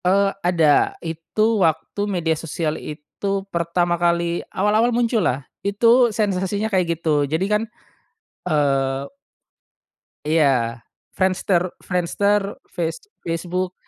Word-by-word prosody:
Eee, 195 +2 +3
ada 165 -5 +3
itu 205 +7 0
waktu 160 +4 0
media 170 -4 0
sosial 160 0 -3
itu 195 +6 -4
pertama 175 0 0
kali 170 0 +1
awal-awal 215 +4 +2
muncullah 225 - +1 0.2
itu 230 +5 +4
sensasinya 205 0 -1
kayak 170 -3 +1
gitu 150 -3 +1
jadi 160 +5 0
kan, 210 +1 +1 0.9
eee 135 -2 +1 1.2
Iya 135 -7 +1 0.3
Friendster 185 -1 +2 0.2
Friendster 200 +3 0 0.2
face 165 +6 -3 0.2
Facebook, 180 +2 -2
175 Hz, 100 wpm, -21 LUFS, 160-200 Hz, 1.2 s, itu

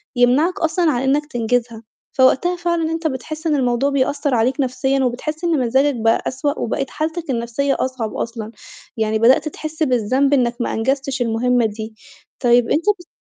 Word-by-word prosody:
يمنعك 260 +9 +3
أصلًا 325 0 +1
عن 245 -3 -1
إنك 285 +3 +1
تنجزها. 235 -3 -2 0.3
فوقتها 270 +7 +3
فعلًا 340 -2 -1
أنت 325 0 -1
بتحس 310 +4 -5
إن 305 - +2
الموضوع 255 0 +1
بيأثر 280 0 0
عليك 245 +6 +1
نفسيًا، 265 +1 0
وبتحس 305 +7 -3
إن 330 -5 +1
مزاجك 265 +3 +2
بقى 225 0 +1
أسوأ، 285 +3 -2
وبقيت 270 +4 -2
حالتك 315 +1 -4
النفسية 240 +3 -1
أصعب 255 -4 -3
أصلًا، 230 -1 -5 0.5
يعني 220 0 0
بدأت 250 +7 +4
تحس 310 +1 -4
بالذنب 260 +2 +1
إنك 240 -3 +2
ما - - -2
أنجزتش 265 +2 -1
المهمة 240 +1 +1
دي. 220 +1 -5 0.4
طيب 240 -1 +3
أنت 320 - +1 0.2
بت 350 - -14
260 Hz, 165 wpm, -19 LUFS, 240-300 Hz, 0.5 s, بدأت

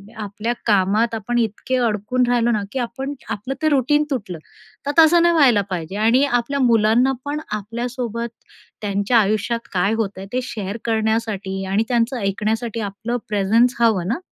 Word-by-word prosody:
आपल्या 215 +2 -3
कामात 210 +2 +2
आपण 225 +3 -2
इतके 225 +3 -1
अडकून 225 +4 0
राहिलो 240 -1 +2
ना 215 -3 0
की 265 - -3
आपण 255 +4 -4 0.2
आपलं 220 +4 -3
ते 310 - +3
रूटीन 295 +1 +3
तुटलं 205 -10 -3 0.5
तर 285 - 0
तसं 325 +2 +7
नाही 345 0 +4
व्हायला 255 -9 +5
पाहिजे 180 0 -4
आणि 230 +5 +4
आपल्या 275 +1 0
मुलांना 235 +1 +4
पण 290 +1 -2
आपल्यासोबत 235 +2 -4 0.5
त्यांच्या 205 +3 +1
आयुष्यात 215 +3 0
काय 195 +2 +1
होतंय 205 -4 -3
ते 255 - +1
शेअर 210 -4 -5
करण्यासाठी 220 -4 -1
आणि 200 +3 +2
त्यांचं 240 +1 +1
ऐकण्यासाठी 220 +3 -2
आपलं 220 +3 -3
प्रेझन्स 220 +4 +3
हवं 215 -7 +2
ना. 235 - -1
230 Hz, 155 wpm, -21 LUFS, 205-245 Hz, 0.5 s, तसं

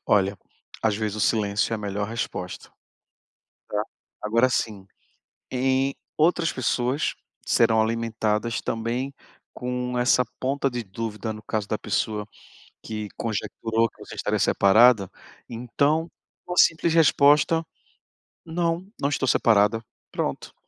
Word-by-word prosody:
Olha, 100 -1 +3 0.5
às 110 -2 +2
vezes 110 -1 -2
o - - -3
silêncio 105 0 +1
é - - +2
a - - -8
melhor 100 0 -3
resposta. 110 -5 -5 1.0
Tá? 105 - 0 0.4
Agora, 115 +4 +3
assim, 105 -5 -2 0.7
em 130 +1 +1 0.2
outras 165 +1 +2
pessoas 130 +2 0 0.3
serão 115 -1 +4
alimentadas 115 0 -1
também 120 +4 -3 0.4
com 125 0 -3
essa 125 +1 +4 0.2
ponta 135 +1 0
de 120 -1 -3
dúvida, 110 +2 -4
no 110 0 -10
caso 105 0 -2
da 110 - -1
pessoa 105 +1 -2 0.6
que 105 -1 -5
conjecturou 115 +1 -1
que - - -31
você - - -9
estaria - - -1
separada, 110 0 +5 0.4
então, 140 +7 0 0.4
uma 175 - -3
simples 165 0 +4
resposta: 160 0 +4 0.8
"Não, 170 +1 -1
não 140 - +1
estou 135 -2 -1
separada", 110 -1 +3 0.3
pronto. - - -3
115 Hz, 120 wpm, -25 LUFS, 110-135 Hz, 1.0 s, separada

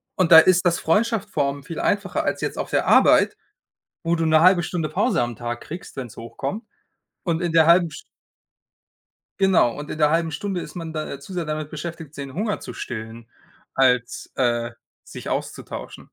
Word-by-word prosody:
Und 180 -3 +1
da 160 - +12
ist 180 +2 +4
das 170 -1 +2
Freundschaft 215 +4 +1
formen 140 -5 -1
viel 160 +3 -6
einfacher 200 -2 0
als - - -1
jetzt - - -3
auf - - -3
der - - 0
Arbeit, - - +5 0.7
wo 170 +1 +1
du 165 - 0
'ne 155 0 +4
1/2 180 0 +6
Stunde 165 -2 -2
Pause 200 - +1
am 120 -2 -3
Tag 120 0 -4
kriegst, 170 +4 -9
wenn's 125 -5 -7
hochkommt. 115 - -5 0.6
Und 170 -1 -1
in 175 -2 -1
der 160 -1 +6
1/2 170 0 +5
St - - -9 1.4
Genau, 190 -11 +3
und 145 +1 -8
in - - -5
der 150 -1 +3
1/2 165 0 +1
Stunde 185 +4 -3
ist - - -10
man 165 -2 -6
da 155 -1 -4
äh, 140 - -8
zu 160 +7 -11
sehr 175 -2 -2
damit 155 0 -4
beschäftigt, 160 -1 -7
den 140 -2 -6
Hunger 210 +1 -1
zu - - -8
stillen, 115 0 -7 0.5
als, 125 -2 +1
äh, 120 -2 0 0.3
sich - - -9
auszutauschen. - - -5
160 Hz, 190 wpm, -23 LUFS, 135-180 Hz, 1.4 s, da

